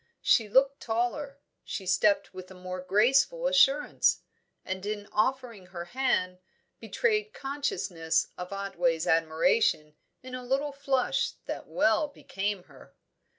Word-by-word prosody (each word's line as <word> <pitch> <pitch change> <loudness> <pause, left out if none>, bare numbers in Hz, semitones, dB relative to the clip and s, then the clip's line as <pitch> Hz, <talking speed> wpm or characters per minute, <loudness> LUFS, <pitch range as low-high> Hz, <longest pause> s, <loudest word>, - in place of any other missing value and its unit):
She 220 -3 +3
looked 270 +5 +3
taller; 245 +5 -2 0.3
she 195 - -6
stepped 185 +3 +2
with 185 -1 -9
a 190 - -12
more 185 0 -6
graceful 265 - +3
assurance, 295 - +3 0.4
and 190 0 -4
in 205 0 -4
offering 230 -3 -1
her 175 -2 -7
hand, 185 -6 0 0.4
betrayed 430 -2 -1
consciousness 270 - -1
of 180 +1 -7
Otway's 175 -5 -1
admiration 160 - +2 0.3
in 255 0 -10
a 255 - -4
little 275 +4 -1
flush 275 -1 0
that - - -6
well 270 0 +2
became 200 -8 -4
her. - - -18
220 Hz, 125 wpm, -28 LUFS, 185-275 Hz, 0.4 s, She